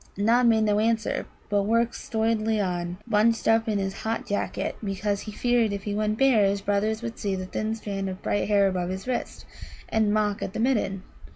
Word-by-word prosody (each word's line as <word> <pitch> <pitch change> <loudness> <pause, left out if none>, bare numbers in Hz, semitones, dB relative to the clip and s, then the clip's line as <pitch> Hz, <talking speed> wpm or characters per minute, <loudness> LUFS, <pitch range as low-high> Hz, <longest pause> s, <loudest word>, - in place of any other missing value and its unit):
Nod 235 +4 +4
made 220 -1 +4
no 210 -1 +2
answer, 225 0 0 0.2
but 205 0 +2
worked 230 +3 +1
stolidly 220 -1 0
on, 175 -2 -2
bunched 225 0 +2
up 225 0 +3
in 210 - +1
his 195 -1 -2
hot 225 +1 -2
jacket, 205 - -2
because 200 0 -1
he 215 - -7
feared 240 0 +1
if 200 -1 -4
he 205 - -3
went 215 +1 0
bare 260 -5 +4
his 200 0 +2
brothers 215 +3 0
would 230 -1 -5
see 200 -3 -1
the 185 0 -4
thin 215 +4 -2
strand 200 -3 -4
of 185 +1 -8
bright 205 - 0
hair 200 -1 +4
about 180 -2 -1
his 190 +4 -5
wrist, 255 - -3 0.4
and 220 -2 +2
mock 210 -1 +1
at 190 - -4
the - - -4
Midden. 215 -6 0
210 Hz, 205 wpm, -26 LUFS, 200-225 Hz, 0.4 s, Nod